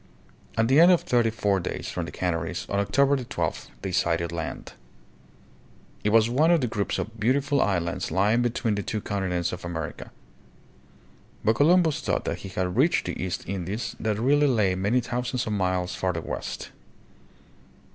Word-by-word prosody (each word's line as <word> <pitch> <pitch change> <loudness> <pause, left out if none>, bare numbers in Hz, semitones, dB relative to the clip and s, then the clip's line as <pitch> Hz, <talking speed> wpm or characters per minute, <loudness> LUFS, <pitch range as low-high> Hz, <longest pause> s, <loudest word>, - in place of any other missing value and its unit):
At 115 0 +3
the 135 +4 +5
end 175 +2 +8
of 175 - +4
thirty 120 -2 +2
four 105 -3 0
days 85 - -4
from - - -3
the - - -7
Canaries, 85 -1 -2
on 100 - -1
October 140 +7 +3
12, - - -3 0.2
they 95 - -2
sighted 85 -1 0
land. 85 -1 -5 1.3
It 105 - +2
was 110 +1 +5
one 140 +7 +3
of 170 -1 +5
the - - +1
groups 105 -4 -2
of 110 +1 -5
beautiful 140 +5 +2
islands 85 -4 -1
lying 105 +5 +2
between 120 -1 0
the 100 - -1
two 110 +2 -3
continents 95 -4 -2
of 90 0 -7
America. 80 -3 -5 1.3
But 110 - +3
Columbus 165 0 +4
thought - - -1
that - - -2
he 95 - -8
had 90 -1 -2
reached 160 +7 +3
the - - -4
East 95 0 -4
Indies 100 +4 -4
that 110 -2 -1
really 145 +6 +3
lay 105 -8 +2
many 100 +7 +1
thousands 125 +1 -2
of 110 - -2
miles 90 -2 0
farther 90 -3 -2
west. - - -5
105 Hz, 170 wpm, -26 LUFS, 90-125 Hz, 1.3 s, end